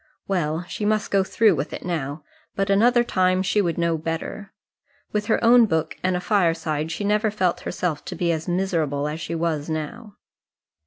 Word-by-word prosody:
Well, 170 -3 -1
she 180 - -6
must 215 0 0
go 195 -1 +3
through 215 +2 +3
with 145 -1 -3
it - - -7
now; 150 -3 -3 0.3
but 195 0 0
another 240 +4 +4
time 185 -4 +1
she 200 +2 +2
would 170 -4 -1
know 170 -1 +1
better. 165 +5 -5 0.6
With 210 -1 -1
her 220 - +3
own 235 0 +7
book 160 -5 -1
and 185 0 +1
a - - 0
fireside 165 -5 0
she 205 - -4
never 210 +2 +2
felt 185 -4 0
herself 165 -5 -3
to 185 - -5
be 170 -1 +1
miserable 165 -6 0
as 155 +2 -4
she 165 - -4
was 160 -2 -1
now. 160 +8 -5
180 Hz, 180 wpm, -23 LUFS, 160-205 Hz, 0.6 s, own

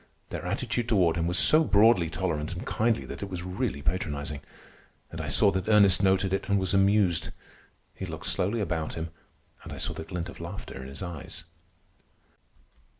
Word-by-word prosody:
Their - - -5
attitude 120 -1 -2
toward 90 -7 +3
him 85 0 -1
was 90 +1 +3
so 155 - +7
broadly 105 - +4
tolerant 80 -2 -2
and 90 - -7
kindly 115 +1 0
that - - -8
it 100 - -5
was 90 -2 -5
really 90 - -3
patronizing. 75 -4 -3 0.7
And - - -5
I - - -5
saw 100 - +4
that 95 +2 -3
Ernest 100 -4 +5
noted 95 -1 +2
it 95 - -2
and 100 - +3
was 95 -1 -1
amused. 95 -4 +3 0.6
He - - -7
looked - - -7
slowly 105 +5 0
about 85 -5 -2
him, 80 0 -5 0.5
and - - -9
I - - -7
saw - - -3
the - - -6
glint 85 +1 -5
of 85 - -11
laughter 85 -5 -7
in 65 - -8
his 70 +6 -8
eyes. 85 -1 -7
90 Hz, 185 wpm, -27 LUFS, 85-100 Hz, 0.7 s, so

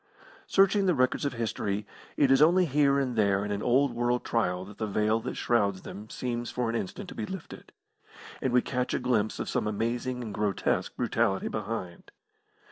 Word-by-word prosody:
Searching 195 0 +4
the 180 - +3
records 130 +2 +1
of 140 - -1
history, 105 -3 -2 0.3
it 140 -3 +4
is 135 +1 +5
only 175 +4 +5
here 140 -2 +3
and 130 -3 0
there 100 -2 +2
in 105 - -3
an 100 0 -2
old 130 +3 +3
world 120 +1 0
trial 90 -5 0
that 105 +1 -13
the 110 - -1
veil 105 +2 +1
that - - -5
shrouds 100 -5 +1
them 105 +2 -9
seems 120 -1 -3
for 120 -2 -1
an - - -3
instant 95 -5 -4
to - - -8
be 110 - -4
lifted, 190 -4 -8 0.7
and 130 - 0
we 125 0 +4
catch 125 -1 -1
a - - 0
glimpse 120 -4 0
of - - -4
some - - -1
amazing 120 +4 -2
and 110 -3 -6
grotesque 105 -2 -1
brutality 95 0 0
behind. 105 -5 -5
120 Hz, 195 wpm, -28 LUFS, 105-130 Hz, 0.7 s, is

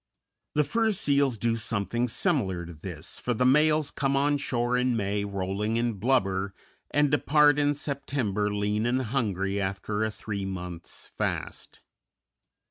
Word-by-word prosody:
The 150 - +4
fur 225 +6 +1
seals 140 - +2
do 115 +2 0
something 115 +2 -1
similar 110 - 0
to 85 - -9
this, 80 +1 -8
for 125 - -1
the 125 - +1
males 150 +2 +4
come 135 -1 0
on 145 +1 +2
shore 120 -2 0
in 125 -1 +1
May 100 -1 -1
rolling 100 +3 -2
in 120 0 +1
blubber, 100 -4 0 0.3
and 145 -1 +2
depart 150 0 +4
in 145 0 +2
September 130 -8 -1
lean 105 +2 0
and 130 +2 +1
hungry 100 -5 -1
after 100 +2 -2
a 110 - +1
three 105 -1 -5
months' 90 -3 -7
fast. - - -4
115 Hz, 145 wpm, -27 LUFS, 100-140 Hz, 0.3 s, The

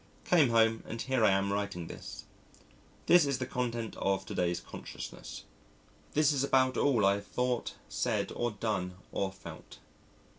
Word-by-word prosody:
Came 160 -8 +5
home 115 -1 +4
and 115 - -5
here 130 -1 +1
I - - +7
am 100 +1 +2
writing 100 -4 -2
this. - - -8 0.8
This 175 -1 +7
is 140 -2 +1
the 130 - -2
content 120 -3 -3
of 95 0 0
to - - -6
day's 85 -1 0
consciousness. - - -8 0.7
This 150 0 +4
is 135 -1 +1
about 130 -2 +3
all 120 -8 +3
I 100 - +5
have 100 - -9
thought, 125 -1 -1
said, - - -1
or 120 - 0
done, 100 -4 -2 0.2
or 95 -1 -1
felt. 95 - -11
115 Hz, 160 wpm, -31 LUFS, 100-130 Hz, 0.8 s, I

